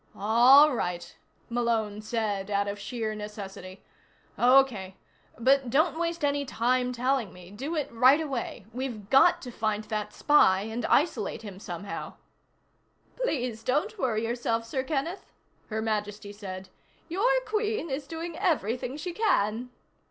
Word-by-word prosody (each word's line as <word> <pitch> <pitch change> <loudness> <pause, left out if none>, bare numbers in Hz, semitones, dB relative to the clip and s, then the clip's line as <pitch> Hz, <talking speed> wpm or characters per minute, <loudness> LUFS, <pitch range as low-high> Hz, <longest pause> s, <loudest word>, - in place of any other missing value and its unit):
"All 245 +8 +6
right," 175 -7 -3 0.3
Malone 230 -3 -1
said, 215 -3 -2
out 200 0 0
of 200 0 -4
sheer 220 0 -3
necessity. 200 -3 -8 0.6
"Okay. 245 -7 +4 0.4
But 265 +2 +3
don't 310 +5 +2
waste 335 -2 -1
any 285 0 +1
time 250 0 0
telling 250 -4 0
me. 180 0 -13
Do 275 +11 -5
it 300 -3 -1
right 255 +5 +5
away. 260 -8 -4
We've 240 -5 -5
got 270 - +5
to 250 - -7
find 215 -2 -1
that 215 -1 -4
spy 200 -9 +4
and 225 +3 -3
isolate 235 - +1
him 195 -3 -9
somehow." 195 0 -6 1.0
"Please 250 - -2
don't 375 - -1
worry 230 -5 0
yourself, 230 -1 -1
Sir 260 +3 -2
Kenneth," 315 +6 -3 0.4
Her 220 0 -2
Majesty 210 -1 -3
said. 190 -2 -8 0.4
"Your 390 +9 +1 0.2
Queen 430 -6 -1
is 275 +1 -3
doing 330 +1 -6
everything 260 - 0
she 350 +3 -5
can." 250 - +1
235 Hz, 135 wpm, -28 LUFS, 210-280 Hz, 1.0 s, All